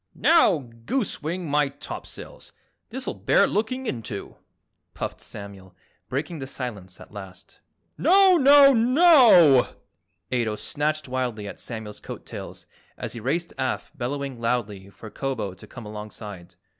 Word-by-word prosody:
"Now, 180 - +4 0.2
goosewing 180 - -2
my 145 -1 +2
topsails, 140 +1 -10 0.4
this'll 260 +3 -4
bear - - +3
looking 255 +5 -2
into!" 110 - -5 0.6
puffed - - -5
Samuel, 100 -3 -11 0.3
breaking 150 +5 -3
the 135 - -6
silence 105 -9 -7
at - - -14
last. 95 -2 -11 0.4
"Now, 375 +4 +6
now, 280 -1 +7
NOW!" 240 - +6 0.6
Ato 115 -4 0
snatched 150 +5 -2
wildly 125 -5 -3
at - - -8
Samuel's 110 -3 -7
coat - - -9
tails - - -9 0.3
as - - -5
he 115 - -7
raced 165 +9 -2
aft 130 +3 -3
bellowing 135 -1 -4
loudly 105 -5 -2
for 110 +2 -12
Kobo 125 -8 -3
to 90 - -14
come 120 -3 -10
alongside. 105 -4 -9
130 Hz, 130 wpm, -24 LUFS, 105-175 Hz, 0.6 s, now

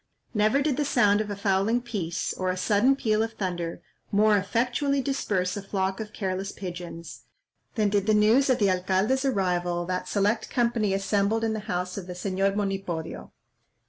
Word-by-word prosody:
Never 215 +6 +2
did 285 -3 0
the 295 - +1
sound 210 -7 +3
of 210 - -4
a 205 - -3
fowling 200 +3 +1
piece, 205 -9 -3
or 185 0 -2
a 185 - -1
sudden 215 +8 +3
peal 220 -5 +1
of 225 0 -2
thunder, 175 -5 -4 0.3
more 210 +1 +4
effectually 245 +8 0
disperse 210 -10 -1
a 205 - -4
flock 195 -1 -2
of 215 -1 -6
careless 195 -1 -3
pigeons, 175 -2 -8 0.5
than 215 -3 +2
did 200 0 0
the 215 - +4
news 225 +6 +4
of 255 - +4
the 200 -3 +3
alcalde's 190 +9 +1
arrival 180 -7 0
that 180 +1 -3
select 205 +2 0
company 235 -4 +1
assembled 200 +3 +1
in 225 -1 +1
the 220 - -2
house 180 0 -2
of 180 - -9
the 180 - -5
Señor 195 +2 -1
Monipodio. 195 -5 -3
200 Hz, 175 wpm, -26 LUFS, 185-225 Hz, 0.5 s, more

